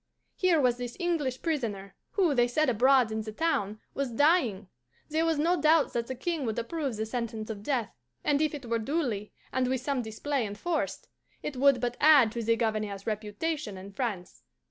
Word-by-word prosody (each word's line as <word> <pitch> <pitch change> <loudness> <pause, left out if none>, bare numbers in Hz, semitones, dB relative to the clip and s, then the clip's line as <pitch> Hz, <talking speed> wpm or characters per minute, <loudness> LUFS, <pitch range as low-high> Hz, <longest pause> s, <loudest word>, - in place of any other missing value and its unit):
Here 360 -4 +3
was 250 -3 +3
this 245 -1 -6
English 300 -8 -1
prisoner, 220 - -2 0.2
who, 360 -7 +3
they 240 -2 +3
said 290 +4 +2
abroad 250 0 +4
in 220 0 -2
the 215 0 -6
town, 215 -7 -1
was 275 -2 -2
dying. 240 - +2 0.4
There 320 +2 +1
was 325 -2 +1
no 335 +2 +2
doubt 310 0 +4
that 235 -1 -1
the 260 - -4
King 320 +3 -2
would 220 - -2
approve 270 +1 -2
the 220 - -1
sentence 225 -1 -4
of 205 -2 -7
death, 240 -2 -1 0.3
and 290 0 +2
if 310 -1 +1
it 280 -3 -8
were 230 0 0
duly 235 -5 -2 0.2
and 255 -1 +1
with 260 -1 0
some 275 -1 -1
display 245 +4 -2
enforced, 225 +11 -3 0.4
it 290 - -4
would 275 0 +4
but 245 0 -2
add 290 -8 +7
to 235 0 -3
the 230 +1 +2
Governor's 215 -3 -2
reputation 215 +3 -3
in 190 +2 -9
France. 200 -6 -4
250 Hz, 190 wpm, -29 LUFS, 220-295 Hz, 0.4 s, add